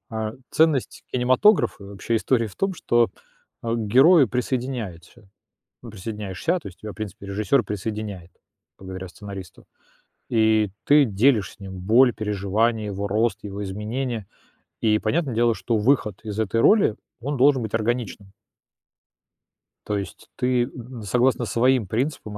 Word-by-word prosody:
А, 110 Hz, -2 st, -3 dB, 0.2 s
ценность 155 Hz, -5 st, +2 dB
кинематографа, 130 Hz, -, +3 dB
вообще, 100 Hz, +3 st, -4 dB
истории 115 Hz, 0 st, +1 dB
в 95 Hz, -, -11 dB
том, 195 Hz, -1 st, -1 dB
что 120 Hz, -6 st, +2 dB, 0.5 s
к 115 Hz, 0 st, -1 dB
герою 135 Hz, -, +6 dB
присоединяется 120 Hz, -5 st, -4 dB, 0.5 s
присоединяешься, 105 Hz, -, -3 dB
то -, -, -10 dB
есть 90 Hz, -, -12 dB
тебя, 110 Hz, -, -6 dB
в -, -, -14 dB
принципе, 100 Hz, -2 st, -7 dB
режиссер 105 Hz, +6 st, +1 dB
присоединяет, 105 Hz, -3 st, -5 dB, 0.5 s
благодаря 95 Hz, 0 st, -7 dB
сценаристу, 95 Hz, -1 st, -10 dB, 0.7 s
и 110 Hz, -3 st, +3 dB
ты 145 Hz, -1 st, +6 dB
делишь 110 Hz, 0 st, +2 dB
с -, -, -24 dB
ним 95 Hz, -1 st, -8 dB
боль, 115 Hz, +7 st, +4 dB
переживания, 105 Hz, +1 st, -1 dB
его 100 Hz, 0 st, -3 dB
рост, 110 Hz, +1 st, 0 dB
его 100 Hz, 0 st, -5 dB
изменения, 110 Hz, +3 st, -4 dB, 0.6 s
и, 110 Hz, -1 st, +2 dB
понятное 135 Hz, +2 st, 0 dB
дело, 115 Hz, 0 st, +2 dB
что 115 Hz, -2 st, -1 dB
выход 105 Hz, -3 st, +1 dB
из 105 Hz, -2 st, -6 dB
этой 110 Hz, +1 st, 0 dB
роли, 205 Hz, -, +5 dB, 0.3 s
он 140 Hz, +4 st, -3 dB
должен 135 Hz, -1 st, +4 dB
быть 110 Hz, 0 st, -5 dB
органичным. 110 Hz, -3 st, -2 dB, 1.6 s
То 105 Hz, -, -1 dB
есть 100 Hz, -, -9 dB
ты, 125 Hz, -1 st, +1 dB
м, 125 Hz, -2 st, -8 dB
согласно 125 Hz, +3 st, +2 dB
своим 125 Hz, 0 st, +2 dB
принципам, 110 Hz, -2 st, -3 dB
110 Hz, 135 wpm, -23 LUFS, 100-125 Hz, 1.6 s, герою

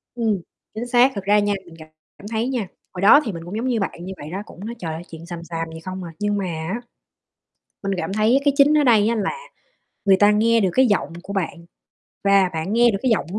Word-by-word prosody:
Ừm, 220 Hz, -5 st, 0 dB, 0.3 s
chính 235 Hz, +3 st, -4 dB
xác, 245 Hz, +2 st, +5 dB
thực 200 Hz, -, -4 dB
ra 205 Hz, +1 st, +4 dB
nha, 205 Hz, 0 st, +1 dB
mình 170 Hz, -, -14 dB, 0.4 s
cảm 200 Hz, -, -11 dB
thấy 225 Hz, +2 st, 0 dB
nha, 245 Hz, -7 st, -2 dB, 0.3 s
hồi 180 Hz, -, -6 dB
đó 210 Hz, +8 st, +8 dB
thì 215 Hz, -, -2 dB
mình 165 Hz, -2 st, -7 dB
cũng 180 Hz, -, -7 dB
giống 250 Hz, +3 st, -2 dB
như 235 Hz, -3 st, +1 dB
bạn 175 Hz, -3 st, -4 dB
như 190 Hz, -, -5 dB
vậy 145 Hz, +1 st, -8 dB
đó, 195 Hz, -, -4 dB
cũng 195 Hz, -, -11 dB
nói 235 Hz, -, -5 dB
trời 160 Hz, -2 st, -4 dB
ơi 160 Hz, -, -6 dB
chuyện 165 Hz, 0 st, -10 dB
xàm 170 Hz, -1 st, -7 dB
xàm 165 Hz, 0 st, -4 dB
gì 160 Hz, -, -8 dB
không 185 Hz, +2 st, -6 dB
à. 170 Hz, -, -7 dB
Nhưng 205 Hz, 0 st, 0 dB
mà 195 Hz, -, -2 dB
á, 170 Hz, +7 st, -4 dB, 1.0 s
mình 195 Hz, -, -1 dB
cảm 175 Hz, +2 st, -3 dB
thấy 220 Hz, +6 st, +3 dB
cái 285 Hz, -, +4 dB
chính 290 Hz, +2 st, +5 dB
ở 295 Hz, -, +4 dB
đây 225 Hz, -5 st, +4 dB
á 235 Hz, -, +1 dB
là 210 Hz, -, -1 dB, 0.7 s
người 195 Hz, -1 st, +5 dB
ta 205 Hz, +1 st, +5 dB
nghe 230 Hz, +2 st, +3 dB
được 195 Hz, -, +2 dB
cái 260 Hz, 0 st, +5 dB
giọng 205 Hz, -6 st, 0 dB
của 200 Hz, -, -7 dB
bạn 170 Hz, -3 st, -3 dB, 0.6 s
và 200 Hz, -2 st, +5 dB
bạn 160 Hz, +4 st, -3 dB
nghe 240 Hz, +1 st, +5 dB
được 195 Hz, -, -2 dB
cái 260 Hz, -, +2 dB
giọng 215 Hz, -, +1 dB
của 210 Hz, -, -2 dB
200 Hz, 260 wpm, -22 LUFS, 175-230 Hz, 1.0 s, đó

